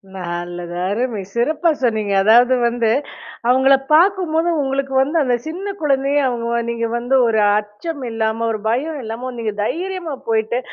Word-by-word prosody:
நல்லது. 175 -1 -5 0.2
அருமை 220 0 -2
சிறப்பா 310 +8 +1
சொன்னீங்க. 215 -4 0
அதாவது 240 +4 +5
வந்து, 235 -1 0 0.6
அவுங்கள 265 +2 +5 0.2
பார்க்கும்போது 345 -1 +3
உங்களுக்கு 270 0 -2
வந்து 290 +5 0
அந்த 250 -2 +1
சின்ன 390 +5 -5
குழந்தைய 275 -1 +1
அவுங்க 235 -2 -2
வ 235 - +1
நீங்க 230 0 -2
வந்து 245 +3 0
ஒரு 220 -1 +2 0.2
அச்சம் 260 +9 -7
இல்லாம, 225 0 -1
ஒரு 215 - -3
பயம் 290 +5 -1
இல்லாம 230 +3 -5
நீங்க 220 -2 -2
தைரியமா 350 - -3
போயிட்டு, 225 +2 +1
245 Hz, 145 wpm, -19 LUFS, 220-295 Hz, 0.6 s, அதாவது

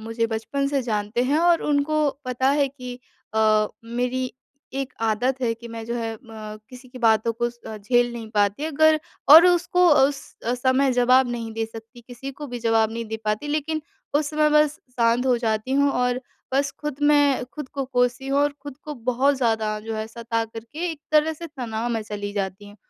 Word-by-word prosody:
मुझे 225 +1 -1
बचपन 225 +5 -2
से 280 -2 0
जानते 215 0 -1
हैं। 280 +4 +2
और 340 0 +3
उनको 300 +1 +1 0.2
पता 255 +1 0
है 280 -1 +2
कि 250 -2 -8 0.4
अ, 215 -1 +4 0.2
मेरी 250 +2 -2 0.5
एक 270 -1 -3
आदत 235 +4 0
है 240 -3 +1
कि 235 +1 -11
मैं 225 -1 -7
जो 235 - -3
है 225 -1 -3
म 220 -3 -10
किसी 255 0 -12
की 255 +1 -11
बातों 225 -1 +3
को 240 - +2 0.3
झेल 240 +3 +2
नहीं 230 -2 -7
पाती 205 +5 +1
अगर 315 0 +4 0.3
और 325 +3 +11
उसको 360 0 +3
उस 275 0 +4 0.4
समय 265 +1 +3
जवाब 250 +1 +4
नहीं 230 -2 -4
दे 225 0 -2
सकती, 225 +2 -12
किसी 245 +3 -8
को 295 +2 -8
भी 245 -2 -6
जवाब 225 -1 +2
नहीं 230 0 -4
दे 220 0 -4
पाती। 215 +7 -1
लेकिन 310 +1 -1 0.3
उस 295 0 +2
समय 305 0 +3
बस 300 0 +3
शांत 240 +1 +2
हो 250 -2 +4
जाती 220 +1 -1
हूँ 280 +1 +3
और 250 0 0 0.3
बस 275 +1 +2
ख़ुद 295 -2 -4
मैं 290 -3 +4
ख़ुद 260 +2 -8
को 275 -1 -4
कोसी 250 0 0
हूँ 275 +1 +2
और 290 0 +2
ख़ुद 285 -2 -8
को 300 - -5
बहुत 265 +3 +3
ज़्यादा 220 -4 0
जो 225 +1 -5
है 215 0 -3
सता 230 0 -3
करके 235 +10 -5
एक 315 -3 -8
तरह 310 +1 +4
से 335 +2 -8
तनाव 240 -6 -4
में 225 -1 -1
चली 205 -1 -5
जाती 200 0 -4
हूँ। 205 - -15
250 Hz, 200 wpm, -23 LUFS, 225-285 Hz, 0.5 s, और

